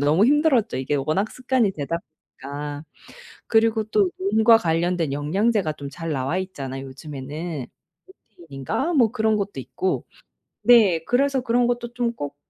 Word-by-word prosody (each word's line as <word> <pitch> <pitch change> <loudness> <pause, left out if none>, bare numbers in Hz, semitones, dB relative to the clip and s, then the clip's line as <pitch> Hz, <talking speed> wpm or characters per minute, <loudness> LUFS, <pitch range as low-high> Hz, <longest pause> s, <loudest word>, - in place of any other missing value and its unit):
너무 155 +9 +4
힘들었죠 285 -5 +3
이게 135 +3 -1
워낙 155 +10 0
습관이 255 -4 +1
되다 160 +1 -3 0.4
보니까. 145 +2 -6 0.6
그리고 225 -1 +2
또 210 -3 +2
눈과 220 +4 +5
관련된 170 -4 0
영양제가 180 +4 0
좀 140 -1 -8
잘 165 -1 -5
나와 135 +5 -1
있잖아요 135 -8 -6
요즘에는. 145 +1 -6 0.7
루테인인가? 175 - -3
뭐 235 -7 +4
그런 220 -2 +1
것도 200 -8 -4
있고. 130 +9 -2 0.6
네. 210 -8 +6
그래서 270 +4 +1
그런 245 0 +2
것도 240 0 -2
좀 240 -1 0
꼬 145 -8 -6
185 Hz, 310 characters per minute, -23 LUFS, 145-230 Hz, 0.7 s, 네